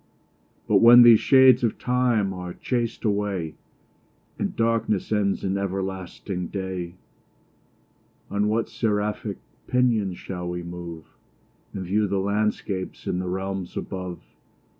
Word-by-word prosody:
But - - +4
when 120 +1 +9
these 115 -2 +8
shades 130 -2 +6
of 115 - 0
time 120 -6 +1
are 90 -1 -7
chas'd 120 -2 -2
away, 100 -6 -1 0.9
And - - -2
darkness 115 -4 0
ends 100 -2 0
in 95 0 -1
everlasting 95 -1 -4
day, 95 -3 -5 1.4
On 100 +1 +1
what 110 +2 0
seraphic 105 -2 -2 0.3
pinions 115 -7 +1
shall 90 -2 -6
we 90 0 -4
move, 85 -2 -8 0.7
And 95 -2 -5
view 105 +3 +1
the 100 0 -1
landscapes 100 -1 -2
in 90 - -1
the 90 - -3
realms 95 0 -4
above? 90 -2 -5
100 Hz, 120 wpm, -24 LUFS, 90-110 Hz, 1.4 s, when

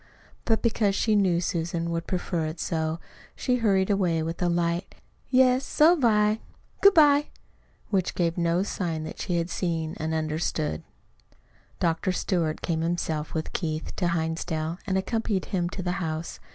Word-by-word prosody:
But 225 -1 +1
because 215 -4 +2
she 215 0 +2
knew 185 -4 +3
Susan 170 -1 -2
would 165 0 -3
prefer 175 -3 -1
it 155 +2 -6
so, 160 0 -1 0.4
she 250 -1 0
turned 195 -3 +2
away 175 -5 +1
with 165 +2 -4
a 175 - +2
light 170 +1 -1 0.3
"Yes, 255 0 +4
so've 310 +2 +4
I. 210 -1 +3 0.4
Good 400 -1 +7
bye!" 295 -2 +6 0.6
which 190 -3 0
gave 170 -2 +1
no 170 +1 +1
sign 170 -5 -3
that 155 - -7
she 175 - -1
had 170 +1 -2
seen 165 -3 -2
and 160 +1 -3
understood. 155 - -1 1.0
Dr. 170 +3 +1
Stewart 170 -4 -1
came 160 -2 0
himself 165 -2 -2
with 155 - -3
Keith 155 -3 -3
to 180 - +1
Hinsdale 160 0 -2
and 190 - +1
accompanied 210 -1 -1
him 175 -3 -1
to 185 0 -6
the 180 - -1
house. 160 0 -4
175 Hz, 160 wpm, -26 LUFS, 165-200 Hz, 1.0 s, Good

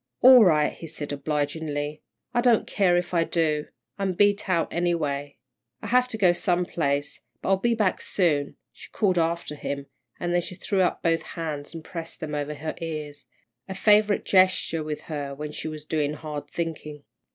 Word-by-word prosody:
"All 255 -2 +9
right," 155 -5 +3
he 165 - -9
said, 145 -2 -6
obligingly. 150 0 -2 0.3
"I 240 - +2
don't 240 -3 +4
care 180 -3 +2
if 175 +1 -2
I 170 -1 +3
do. 155 -3 0 0.3
I'm 195 -2 0
beat 205 +2 +2
out, 170 -3 +1
anyway." 150 -5 -1 0.5
"I - - -4
have 250 +1 +4
to 240 -3 -4
go 185 -5 +5
some 180 -1 +1
place, 145 -4 -1 0.2
but - - -4
I'll 195 - +4
be 235 +4 +1
back 210 -4 +1
soon," 150 -7 +1 0.2
she - - -13
called 185 -5 +1
after 165 -1 -1
him, 140 -1 -4 0.3
then 175 0 +1
she 180 - -7
threw 195 +1 0
up 180 - 0
both 165 -1 +2 0.2
hands 155 -2 -4
and 165 - -7
pressed 165 -1 -7
them 155 -2 -5
over 150 0 -3
her 155 +2 -4
ears, 150 -3 -6 0.4
a 190 - -4
favourite 210 +1 +4
gesture 185 -4 +3
with 150 -1 -4
her 145 -3 -5
when 150 +1 -6
she 155 - -5
was 155 -1 -7
doing 150 -2 0
hard 150 -1 -6
thinking. 150 -3 -5
165 Hz, 185 wpm, -25 LUFS, 150-185 Hz, 0.5 s, All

